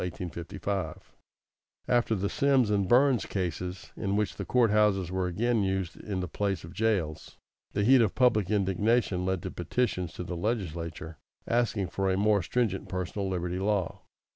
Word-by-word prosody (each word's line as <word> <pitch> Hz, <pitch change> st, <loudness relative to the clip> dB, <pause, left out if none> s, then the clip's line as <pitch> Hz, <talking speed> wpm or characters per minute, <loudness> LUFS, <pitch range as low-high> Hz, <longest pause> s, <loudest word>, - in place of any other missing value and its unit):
After 120 Hz, -2 st, +2 dB
the 100 Hz, 0 st, -1 dB
Sims 135 Hz, -4 st, +2 dB
and 100 Hz, -3 st, +1 dB
Burns 130 Hz, -3 st, +4 dB
cases, 90 Hz, -1 st, -4 dB
in 100 Hz, +1 st, -1 dB
which 105 Hz, -1 st, 0 dB
the -, -, -5 dB
court 120 Hz, -4 st, +3 dB
houses 100 Hz, -4 st, +2 dB
were 95 Hz, 0 st, 0 dB
again 115 Hz, +5 st, +1 dB
used 95 Hz, -3 st, -1 dB
in 95 Hz, -3 st, -4 dB
the 90 Hz, -, -3 dB
place 95 Hz, 0 st, -2 dB
of 80 Hz, +2 st, -10 dB
jails, 85 Hz, -7 st, -1 dB, 0.4 s
the 100 Hz, -, +1 dB
heat 130 Hz, +3 st, +6 dB
of 110 Hz, -4 st, +1 dB
public 115 Hz, -7 st, +3 dB
indignation 100 Hz, -1 st, +1 dB
led 95 Hz, -1 st, -1 dB
to 95 Hz, -, -4 dB
petitions 90 Hz, -2 st, -1 dB
to -, -, -5 dB
the 90 Hz, 0 st, -5 dB
legislature 85 Hz, -6 st, -3 dB, 0.3 s
asking 115 Hz, -5 st, +1 dB
for 95 Hz, 0 st, -1 dB
a 95 Hz, -, +1 dB
more 105 Hz, 0 st, +3 dB
stringent 105 Hz, +1 st, -1 dB
personal 95 Hz, +2 st, -3 dB
liberty 90 Hz, 0 st, -2 dB
law. 100 Hz, -2 st, -1 dB
95 Hz, 160 wpm, -29 LUFS, 90-110 Hz, 0.4 s, heat